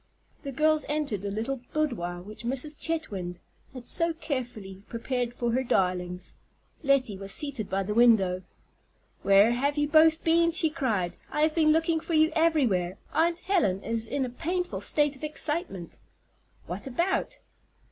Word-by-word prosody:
The 280 - -6
girls 310 +3 +2
entered 295 -10 -1
the 200 - -3
little 230 +6 -3
boudoir 195 - -2
which 215 +4 -10
Mrs. 270 +5 -1
Chetwynd 200 - -3 0.3
had 255 -2 -10
so 335 0 +3
carefully 240 - -5
prepared 245 +1 -2
for 240 -1 -2
her 255 +3 +1
darlings. 180 -5 -1 0.5
Lettie 265 -9 +1
was 195 0 -5
seated 275 -7 -3
by 195 +1 0
the 210 +2 -3
window. 210 -6 +4 0.8
"Where 200 +3 +5
have 280 +4 0
you 295 0 +2
both 315 +1 +5
been?" 335 0 +3
she 320 -1 +4
cried. 215 - -1
"I 300 - -2
have 310 0 +3
been 310 -2 +4
looking 325 +1 +2
for 330 +1 -3
you 315 +1 +4
everywhere. 250 - +2 0.2
Aunt 335 +3 +1
Helen 250 - +1
is 230 0 -1
in 275 +2 -1
a - - -5
painful 355 +7 -3
state 295 -1 +1
of 265 - -16
excitement." 300 - -2 0.7
"What 185 +8 -5
about?" 350 - -1
260 Hz, 155 wpm, -27 LUFS, 200-310 Hz, 0.8 s, Where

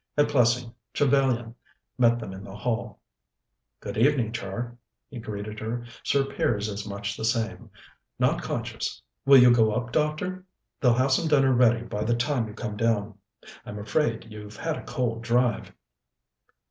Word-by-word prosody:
At 145 0 +4
Plessing, 120 -3 +2 0.2
Trevellyan 130 -5 +2 0.5
met 120 -1 +5
them 105 -5 -6
in 95 +1 -9
the 100 -1 -9
hall. 115 +2 -3 0.8
"Good - - -4
evening, 125 -3 +3
Char," 115 +2 -5 0.4
he 125 - -6
greeted 105 -1 -6
her. 120 +2 -4 0.2
"Sir 140 -1 +2
Piers 110 -5 -1
is 100 0 -5
much 100 0 -4
the - - -6
same. 115 0 -1 0.5
Not - - +2
conscious. - - -4 0.3
Will 140 0 +9
you 125 -1 +8
go 110 -3 +4
up, 120 +1 -2
doctor? 155 +6 -1 0.4
They'll 125 -2 +4
have 130 +2 +2
some 160 +5 +2
dinner 135 -3 +4
ready 120 -1 +4
by 105 -3 -3
the 120 +2 +1
time 120 -1 0
you 105 - -10
come 110 -2 -5
down. 105 -2 0 0.4
I'm 105 - -7
afraid 115 +3 0
you've 105 -1 -10
had 165 -1 -2
a - - -8
cold 115 -3 -2
drive." 120 0 +1
120 Hz, 160 wpm, -26 LUFS, 110-130 Hz, 0.8 s, Will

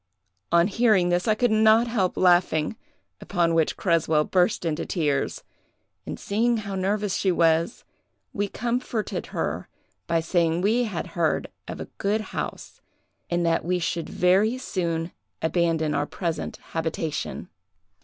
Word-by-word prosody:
"On 170 0 +5
hearing 210 -3 +3
this, 175 +3 +1
I 215 - +4
could 245 +1 +2
not 220 +1 +5
help 215 -6 0
laughing, 175 -1 +3 0.5
upon 170 -4 +1
which 165 -1 +1
Creswell 160 -4 +2
burst 180 +1 +1
into 160 -1 -1
tears; 150 -6 -1 0.6
and - - -5
seeing 230 +3 +1
how 200 -2 -5
nervous 200 +1 0
she 190 - +1
was, 165 +4 +2 0.5
we 205 0 -1
comforted 235 0 -3
her - - -3 0.4
by 170 -1 +2
saying 165 0 +1
we 230 +5 +2
had 200 -7 -4
heard 165 -5 0 0.2
of - - -6
a - - -4
good 210 +2 +1
house, - - -5 0.5
and 175 0 0
that 165 0 +1
we 180 +2 0
should 170 -1 -2
very 195 +7 +3
soon 170 -8 -2 0.3
abandon 160 -2 +1
our 145 0 0
present 170 -3 -3
habitation. 160 -1 -3
180 Hz, 140 wpm, -25 LUFS, 165-210 Hz, 0.6 s, On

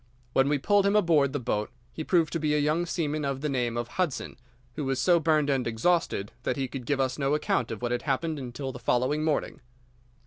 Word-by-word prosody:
When 135 +1 +3
we 145 - +2
pulled 200 +7 +3
him 200 - +2
aboard 165 -9 +4
the 145 - -2
boat 105 -4 -2 0.2
he 160 - -5
proved 165 -1 +2
to 165 - 0
be 150 -1 +1
a - - +3
young 155 +4 +1
seaman 155 -3 -1
of 140 -1 -2
the 150 - -1
name 120 -3 -1
of 120 0 -2
Hudson, 170 +1 -2 0.4
who 150 - -4
was 135 -1 -1
so 170 +6 +4
burned 155 -2 +2
and 135 -4 +1
exhausted 115 - 0
that - - -2
he 135 -1 -1
could 125 -1 -7
give 140 -2 +1
us 130 0 0
no 140 +1 +2
account 125 -5 0
of 115 +1 -6
what 120 - -1
had 120 0 0
happened 155 +3 -1
until 130 +1 -5
the 125 - -9
following 130 +6 +1
morning. 155 -2 -1
140 Hz, 235 wpm, -27 LUFS, 125-155 Hz, 0.4 s, aboard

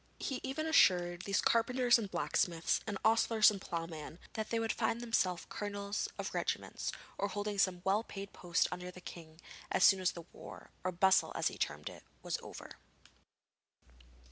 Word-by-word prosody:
He 265 - -3
even 275 +4 -3
assured 175 - +4
these 200 0 +1
carpenters 240 +1 +4
and 205 -3 -4
blacksmiths 170 -3 +1
and 205 -3 -2
ostlers 225 -1 +5
and 200 -2 -6
ploughmen 165 -2 -5 0.2
that 220 -1 -3
they 230 - 0
would 225 -1 0
find 225 0 0
themselves 210 -7 0
colonels 205 0 -3
of - - -4
regiments, - - -2 0.3
or 200 - +1
holding 205 +1 -3
some 180 -2 +2
well 200 +3 +2
paid 200 -3 -8
post 175 -2 +1
under 180 0 -5
the 180 - -10
king, 165 -3 -11 0.3
as 185 - +2
soon 195 -1 +7
as 185 -1 +1
the 170 -2 -9
war - - -11
or 185 - 0
bustle 190 +2 +4
as - - +1
he - - -9
termed - - -2
it - - -8 0.2
was - - -2
over. - - -10
200 Hz, 170 wpm, -34 LUFS, 180-225 Hz, 0.3 s, soon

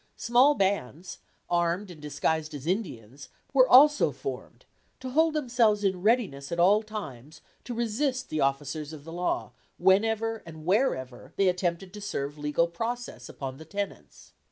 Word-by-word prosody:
Small 250 +5 +4
bands, 190 - -2 0.3
armed 175 +3 0
and 160 -4 -13
disguised 150 +1 -2
as 140 -1 -8
Indians, 140 - -4 0.2
were 260 -2 +5
also 295 +4 +7
formed - - -7 0.3
to 260 0 -6
hold 320 +3 +3
themselves 235 -7 +2
in 190 -2 0
readiness 200 - +1
at 170 - -2
all 200 +5 +5
times 155 - -8 0.3
to 240 - -5
resist 255 +3 -1
the 155 - -1
officers 140 +2 -2
of 150 -2 -10
the 165 +2 -9
law 175 +1 -2 0.3
whenever 225 +4 +2
and 160 -1 -11
wherever 165 - -1
they 195 - +2
attempted 180 +1 -1
to 210 - -8
serve 145 -7 -4
legal 150 +3 +1
process 235 +8 -5
upon 135 -1 -6
the 160 - -11
tenants. 200 +4 -7
185 Hz, 155 wpm, -27 LUFS, 150-225 Hz, 0.3 s, also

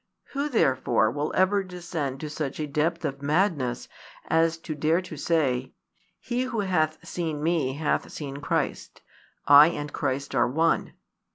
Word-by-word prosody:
Who 285 +2 -2
therefore 130 - +2
will 145 +4 -2
ever 195 +2 +3
descend 170 -7 -5
to 155 - -4
such 150 -2 -4
a 155 - -1
depth 160 +4 -1
of 140 -1 -3
madness 145 -5 0 0.4
as 165 0 +3
to 160 -1 -6
dare 155 +3 +2
to 175 -3 -8
say: 135 -5 0 0.5
"He 250 +1 -2
who 235 -4 -2
hath 165 -4 0
seen 160 -4 -3
me 160 -5 +1
hath 150 +2 -1
seen 140 -2 -6
Christ: 145 -2 -3 0.4
I 145 +1 +9
and 150 -3 -4
Christ 135 +2 -2
are 125 -2 +3
one"? 160 +6 +1
155 Hz, 155 wpm, -26 LUFS, 140-170 Hz, 0.5 s, I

